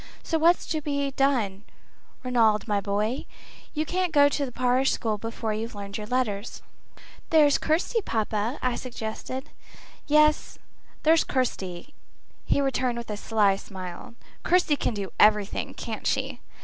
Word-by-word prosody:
So 325 - 0
what's 340 +2 +4
to 310 -2 -2
be 280 -1 -1
done, 245 -8 +1 0.6
Ranald, 230 -4 +2
my 205 -2 +1
boy? 210 +5 -1 0.5
You 310 +1 0
can't 360 +1 -1
go 285 -1 +6
to 285 0 -1
the - - -8
parish 255 +2 +2
school 215 -2 -1
before 225 0 -3
you've 220 +1 -4
learned 200 0 -7
your 210 - -6
letters." 235 -4 -2 0.7
"There's 300 -3 +5
Kirsty, 345 +9 +1
papa," 220 - -1
I 250 -1 0
suggested. 250 +2 -6 0.6
"Yes; 305 0 +3 0.5
there's 320 +1 +5
Kirsty," 230 -3 -3 0.5
he 280 - +2
returned 255 -3 0
with 235 -2 -6
a - - -2
sly 210 -2 +2
smile. 190 +3 -9 0.3
"Kirsty 355 -4 +3
can 245 - -2
do 200 -2 -4
everything, 210 -1 +3
can't - - -5
she?" - - -1
245 Hz, 145 wpm, -26 LUFS, 210-285 Hz, 0.7 s, go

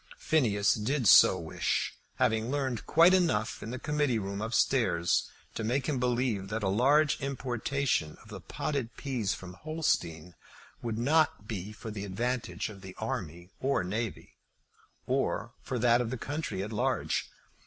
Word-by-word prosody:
Phineas 110 -10 +2
did 120 +3 0
so - - +8
wish, - - -1 0.2
having 110 +1 +1
learned 130 -5 -2
quite 170 +3 +6
enough 160 - +1
in - - -6
the 125 - -4
Committee 150 -3 0
Room 100 -1 -4
up 110 +1 -3
stairs 115 -9 +2 0.2
to 110 - -4
make 125 +4 0
him 140 -4 -1
believe 120 -5 0
that 110 +1 -3
a 95 - +2
large 145 +10 +3
importation 135 - -1
of - - -18
the - - -8
potted 135 -6 -3
peas 120 -8 -1
from 95 -1 -9
Holstein 90 - -2 0.5
would 115 -2 -3
not 140 -3 +2
be 105 -2 -5
for 110 +1 -8
the 105 -1 -5
advantage 120 +5 -2
of 100 -3 -10
the 95 -1 -10
army 85 +4 -5
or 135 -7 +1
navy, 105 +4 -4 0.7
or - - -1
for 130 - -3
that 120 0 +4
of 120 - -2
the 130 - -3
country 145 -7 -3
at 105 +2 -6
large. 105 - 0
115 Hz, 160 wpm, -30 LUFS, 100-135 Hz, 0.7 s, so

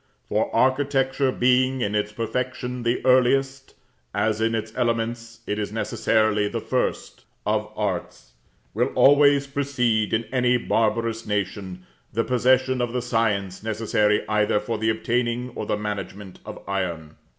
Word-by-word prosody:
For - - +1
architecture 135 0 +2
being 130 +1 +2
in 105 -2 -1
its 105 0 0
perfection 125 +3 -3
the 120 +1 -1
earliest, 135 +1 +2 0.4
as 110 0 0
in 115 0 +1
its 110 0 -4
elements 115 -1 -2
it 105 - -2
is 105 -1 -3
necessarily 110 -1 +1
the - - -3
first, - - -3 0.2
of - - -1
arts, - - -4 0.4
will - - 0
always 140 0 +5
precede, 130 -6 0
in 110 +1 +1
any 125 -1 +3
barbarous 115 0 0
nation, 95 -3 -3 0.3
the 115 +1 0
possession 130 +1 +2
of 120 -1 -2
the 125 - -1
science 105 -6 -1
necessary 105 -1 0
either 105 -1 +2
for 110 +1 -4
the 110 0 +1
obtaining 120 +2 -1
or - - -5
the - - 0
management 100 -2 -6
of - - -9
iron. 85 -6 -3
115 Hz, 140 wpm, -24 LUFS, 105-125 Hz, 0.4 s, always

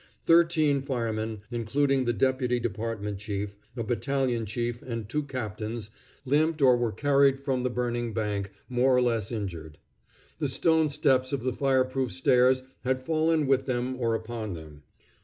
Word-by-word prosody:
Thirteen 165 -4 +4
firemen, 110 -5 -3
including 135 +3 +1
the 120 - +2
deputy 125 +1 +1
department 110 -2 -3
chief, 100 -1 -4 0.2
a 115 - -1
battalion 120 0 -1
chief, 120 +2 -3
and 115 -4 -5
two 150 +7 -1
captains, 110 -5 -5 0.3
limped 155 +4 +2
or 130 -3 +6
were 120 -2 0
carried 140 +1 +3
from 135 -2 -1
the 125 - 0
burning 120 -1 -2
bank, 105 -2 -2 0.2
more 125 0 +3
or - - +4
less 115 -4 0
injured. 85 -9 -5 0.6
The 145 -3 0
stone 160 +3 +3
steps 135 -3 +2
of 135 -4 -2
the 130 -1 0
fire 130 -1 +2
proof 130 -1 -2
stairs 130 0 +3 0.2
had 130 0 -1
fallen 160 +1 +2
with 135 0 +2
them 125 0 -1
or 115 -2 +1
upon 110 -3 -5
them. 75 -2 -11
125 Hz, 160 wpm, -27 LUFS, 110-135 Hz, 0.6 s, or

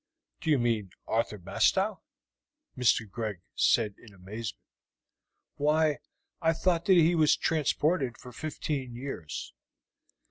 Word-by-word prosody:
"Do - - -3
you 150 - +5
mean 115 -5 0 0.2
Arthur 110 -1 0
Bastow?" 90 - +1 0.7
Mr. 115 -2 +3
Greg 105 -2 -4
said 110 -4 +3
in 105 -4 -16
amazement. 105 +4 -6 1.0
"Why, 150 0 +2 0.4
I 165 0 +3
thought 170 0 +1
that 190 - +6
he 170 +1 +5
was 155 -3 +4
transported 150 -3 +1
for 125 - -11
fifteen 140 -2 -4
years." 120 - -6
125 Hz, 115 wpm, -29 LUFS, 110-155 Hz, 1.0 s, that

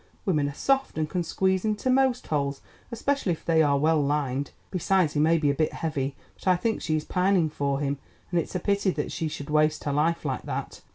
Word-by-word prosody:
Women 150 -7 +1
are 145 - -8
soft, 270 - +1
and 155 -1 0
can 180 +3 -1
squeeze 190 +2 0
into 215 +4 0
most 260 -1 +2
holes, 140 -2 -1 0.3
especially 235 -4 0
if 160 - -10
they 165 -1 +4
are 145 -2 +3
well 155 +2 +3
lined. 140 -1 -1 0.2
Besides, 185 -3 +2
he 145 - 0
may 160 +2 +4
be 150 -3 +2
a - - 0
bit 155 +2 0
heavy, 140 -4 -2 0.2
but - - -12
I 185 - +6
think 220 +5 -1
she 155 - 0
is 155 - -2
pining 180 -3 +2
for 140 -2 -1
him, 140 -1 -1 0.3
and 175 - +2
it's 170 - -4
a - - +1
pity 200 +2 +1
that - - -2
she 160 - -2
should 145 -1 -6
waste 155 0 +2
her 145 - -1
life 160 +3 +1
like 130 -3 -1
that. - - -5
160 Hz, 230 wpm, -26 LUFS, 145-190 Hz, 0.3 s, I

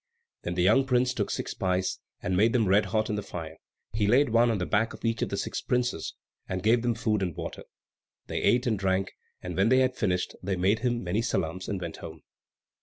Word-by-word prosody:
Then 90 - -4
the 90 - +2
young 115 +8 +4
prince 125 0 +2
took 105 -4 -2
six - - -3
pice, 90 0 -1 0.2
and 90 - 0
made 110 +5 +4
them 115 -5 +2
red 100 +3 +4
hot 110 -1 0
in 105 - -1
the - - -1
fire; 80 -4 -7 0.4
he 105 -2 +1
laid 130 +5 +4
one 115 +1 +4
on 115 - +1
the 90 - -2
back 110 +4 +1
of - - -9
each 115 0 0
of - - 0
the - - -3
six - - -3
princes, 125 -9 -1 0.3
and 95 0 -3
gave 115 +2 +4
them 120 0 +1
good 115 - -11
food 105 -3 +1
and 90 -5 -2
water. - - -6 0.6
They - - -3
ate 125 +2 +3
and 110 -5 0
drank; 95 0 0 0.3
and 90 -1 -5
when 95 +4 +3
they 130 - +5
had 130 0 +1
finished 90 -7 -1
they 95 +1 -1
made 95 +5 +2
him 120 0 -1
many 95 +5 0
salaams 95 -5 -2
and 100 - -2
went 85 -2 -6
home. 80 -3 -10
105 Hz, 240 wpm, -28 LUFS, 90-120 Hz, 0.6 s, they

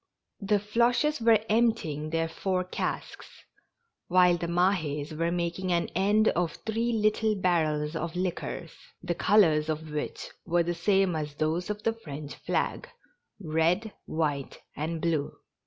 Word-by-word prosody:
The 205 0 +2
Floches 240 +7 +1
were 225 -2 +4
emptying 215 -10 +1
their 165 0 0
four 185 +2 -1
casks, 185 - -4 0.8
while 180 0 +5
the 170 0 -3
Mahds 165 -5 0
were 165 +2 0
making 175 +1 -2
an 170 -1 +1
end 205 +4 +3
of 170 -1 0
three 225 +2 0
little 215 0 +2
barrels 160 -5 +1
of 165 +1 -3
liquors, 180 -2 -3 0.3
the 175 -1 -1
colors 165 -5 +4
of 155 0 -3
which 150 0 -4
were 175 0 +2
the 175 +1 -1
same 190 +1 +2
as 150 -2 -4
those 160 +5 -1
of 210 0 -4
the 225 - +1
French 150 -9 -8
flag - - -2 0.3
— 480 - -51
red, 175 +5 0
white 145 -4 -2 0.2
and 160 +2 -3
blue. 160 -4 0
175 Hz, 145 wpm, -28 LUFS, 160-210 Hz, 0.8 s, while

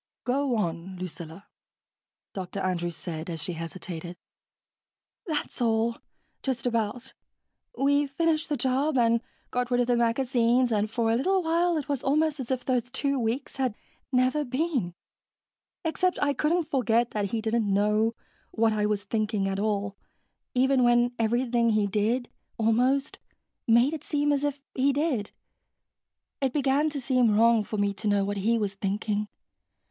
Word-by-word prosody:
"Go 265 0 0
on, 175 -1 -3
Lucilla," 170 0 -8 0.9
Dr. 190 0 -5
Andrews 175 -3 -1
said, 165 -1 -6
as 165 -2 -4
she 180 - -3
hesitated. 170 +1 -7 1.1
"That's 300 -4 -3
all, 230 0 +1 0.4
just 255 -3 -2
about. 235 +1 -1 0.6
We 285 +1 +3
finished 315 +2 0
the 295 - 0
job 265 +4 +1
and 230 -1 +3 0.3
got 245 0 -1
rid 245 -1 +2
of 245 - +3
the 245 0 +2
magazines 240 +1 +2
and 215 -1 +1
for 225 0 0
a - - +3
little 375 +9 +1
while 335 +1 +2
it 295 - -4
was 285 -3 -1
almost 305 +2 +1
as 255 - -5
if 260 -1 -2
those 245 -2 0
two 275 +1 -1
weeks 240 +5 -2
had 255 -5 0 0.4
never 255 +3 +2
been, 255 - -1 0.9
except 365 +3 +1
I 285 -1 +2
couldn't 320 +2 0
forget 240 -3 +2
that 210 -1 -1
he 220 +3 -2
didn't 220 -1 0
know 210 +3 +2 0.3
what 225 -1 +2
I 210 -1 +1
was 210 -1 -1
thinking 210 -1 -1
at 195 0 -2
all, 205 -1 -1 0.6
even 260 0 +3
when 240 0 +4
everything 235 +1 +2
he 215 -2 +2
did, 220 +5 0 0.3
almost, 250 +5 +1 0.5
made 240 +6 +4
it 305 -2 -5
seem 290 -1 +1
as 285 0 +1
if 290 -1 -1
he 275 +1 +2
did. 275 -8 0 1.1
It 265 -2 0
began 285 +1 +2
to 290 -2 -4
seem 250 -4 +2
wrong 230 -1 +5
for 215 - -5
me 200 0 +1
to 205 +2 -5
know 200 -1 +2
what 205 0 -2
he 225 +4 +2
was 205 -3 -1
thinking. 205 +1 -2
235 Hz, 160 wpm, -27 LUFS, 210-270 Hz, 1.1 s, wrong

